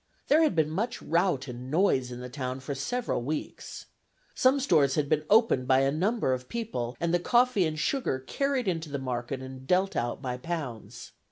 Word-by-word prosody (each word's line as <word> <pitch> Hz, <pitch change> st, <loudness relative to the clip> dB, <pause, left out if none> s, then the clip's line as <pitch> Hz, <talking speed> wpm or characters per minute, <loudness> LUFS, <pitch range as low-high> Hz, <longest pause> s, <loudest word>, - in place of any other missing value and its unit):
There 305 Hz, +3 st, +6 dB
had 310 Hz, -, +3 dB
been 155 Hz, -1 st, +2 dB
much 215 Hz, +9 st, -2 dB
rout 170 Hz, -5 st, 0 dB
and 125 Hz, +1 st, -7 dB
noise 135 Hz, -6 st, +2 dB
in 120 Hz, 0 st, -7 dB
the 125 Hz, -, -6 dB
town 130 Hz, 0 st, -4 dB
for 135 Hz, +2 st, -5 dB
several 145 Hz, -, -2 dB
weeks. 150 Hz, +5 st, -5 dB, 0.5 s
Some 260 Hz, +2 st, +3 dB
stores 145 Hz, -, +3 dB
had 150 Hz, -2 st, +1 dB
been 155 Hz, 0 st, +1 dB
opened 210 Hz, -, +4 dB
by 130 Hz, 0 st, +5 dB
a 135 Hz, 0 st, +2 dB
number 185 Hz, -, +1 dB
of 125 Hz, 0 st, -5 dB
people, 170 Hz, -, -4 dB
and 170 Hz, 0 st, 0 dB
the 175 Hz, -, +3 dB
coffee 240 Hz, -2 st, +3 dB
and 155 Hz, 0 st, -4 dB
sugar 245 Hz, -, 0 dB
carried 260 Hz, -, -1 dB
into 165 Hz, -4 st, -2 dB
the 140 Hz, -, -3 dB
market 130 Hz, 0 st, -4 dB
and 130 Hz, 0 st, -9 dB
dealt 190 Hz, +3 st, +2 dB
out 120 Hz, -, -1 dB
by 125 Hz, -2 st, -4 dB
pounds. 135 Hz, -5 st, -6 dB
150 Hz, 195 wpm, -28 LUFS, 130-195 Hz, 0.5 s, There